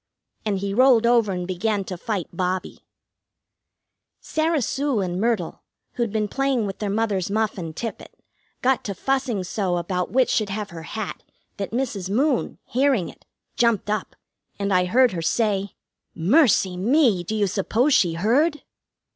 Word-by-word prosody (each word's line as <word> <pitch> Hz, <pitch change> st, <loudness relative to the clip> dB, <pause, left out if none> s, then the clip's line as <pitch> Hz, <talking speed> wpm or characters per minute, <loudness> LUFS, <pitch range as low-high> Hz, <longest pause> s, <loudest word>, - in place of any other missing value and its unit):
And 200 Hz, -2 st, +1 dB
he 195 Hz, +1 st, -3 dB
rolled 245 Hz, 0 st, +5 dB
over 235 Hz, -4 st, +3 dB
and 180 Hz, -1 st, -3 dB
began 195 Hz, +3 st, -1 dB
to 185 Hz, -, -6 dB
fight 190 Hz, -1 st, -3 dB
Bobbie. 185 Hz, +1 st, -2 dB, 1.4 s
Sarah 315 Hz, -3 st, 0 dB
Sue 275 Hz, -1 st, 0 dB
and 180 Hz, -1 st, -2 dB
Myrtle, 225 Hz, -7 st, -1 dB, 0.3 s
who'd 235 Hz, -3 st, -1 dB
been 215 Hz, -1 st, 0 dB
playing 270 Hz, -1 st, 0 dB
with 195 Hz, -1 st, -5 dB
their 210 Hz, -, -2 dB
mother's 205 Hz, -3 st, 0 dB
muff 215 Hz, +1 st, 0 dB
and 165 Hz, -5 st, -6 dB
tippet, 225 Hz, +2 st, -6 dB, 0.5 s
got 260 Hz, 0 st, +2 dB
to 200 Hz, -, -3 dB
fussing 255 Hz, -4 st, -1 dB
so 185 Hz, -1 st, -1 dB
about 180 Hz, +1 st, -2 dB
which 255 Hz, 0 st, +2 dB
should 215 Hz, -2 st, +1 dB
have 205 Hz, 0 st, -4 dB
her 165 Hz, -1 st, -8 dB, 0.2 s
hat 215 Hz, -3 st, -4 dB, 0.4 s
that 200 Hz, -1 st, -3 dB
Mrs. 225 Hz, -7 st, -3 dB
Moon, 260 Hz, +5 st, +1 dB
hearing 255 Hz, -, +1 dB
it, -, -, -17 dB, 0.3 s
jumped 230 Hz, -4 st, +1 dB
up, 215 Hz, -2 st, -3 dB, 0.4 s
and 200 Hz, -1 st, -1 dB
I 180 Hz, 0 st, +3 dB
heard 245 Hz, +6 st, +4 dB
her 170 Hz, -, -3 dB
say: 200 Hz, +1 st, 0 dB, 0.4 s
"Mercy 195 Hz, -, +3 dB
me! 225 Hz, -, +3 dB
Do 215 Hz, +5 st, -3 dB
you 210 Hz, -1 st, +2 dB
suppose 220 Hz, +8 st, +1 dB
she 175 Hz, -8 st, +3 dB
heard?" 270 Hz, -, +1 dB
210 Hz, 160 wpm, -23 LUFS, 185-245 Hz, 1.4 s, rolled